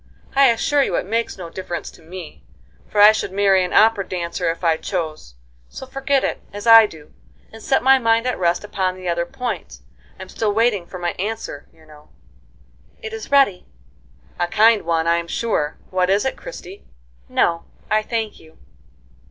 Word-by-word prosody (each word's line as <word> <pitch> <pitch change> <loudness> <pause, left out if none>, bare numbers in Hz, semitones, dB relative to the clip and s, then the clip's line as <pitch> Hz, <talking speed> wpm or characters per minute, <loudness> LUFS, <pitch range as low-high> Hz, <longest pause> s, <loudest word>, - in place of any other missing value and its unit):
I 275 0 +6
assure 270 +5 +2
you - - 0
it - - -1
makes 230 +3 -2
no 170 -3 -8
difference 180 -2 -6
to - - -18
me, 165 - -10 0.5
for 210 - -2
I 210 +1 +9
should 215 -3 -3
marry 195 -1 +3
an 180 - -4
opera 220 -2 +4
dancer 175 -1 -3
if 165 +2 -4
I 165 -2 +2
chose, 155 - -5 0.3
so - - -9
forget 270 0 0
it, - - -2
as 205 +2 -8
I 225 -1 +8
do, 155 -5 -15 0.4
and 225 - -11
set 270 +4 +1
my 265 +1 +6
mind 230 0 +2
at 250 - -2
rest 175 +1 +1
upon 190 -3 -2
the 185 -1 -8
other 170 0 -1
point. 250 +1 -6 0.4
I'm - - -8
still 215 -2 -1
waiting 215 -5 +1
for 185 - -8
my 175 -1 -2
answer, 205 -7 -5
you 160 -1 -22
know." 150 -1 -18 0.9
"It 445 -1 -8
is 445 - -7
ready." 275 -10 +3 0.7
"A 175 - +1
kind 220 +3 +4
one, 165 -1 0
I'm 170 0 +1
sure. 165 -8 -2
What 185 -1 +1
is 200 +4 +2
it, 265 - -1
Christie?" 205 - -10 0.5
"No, 170 -1 +1 0.3
I 215 0 +3
thank 220 -1 -4
you." 160 0 -19
195 Hz, 185 wpm, -20 LUFS, 170-225 Hz, 0.9 s, I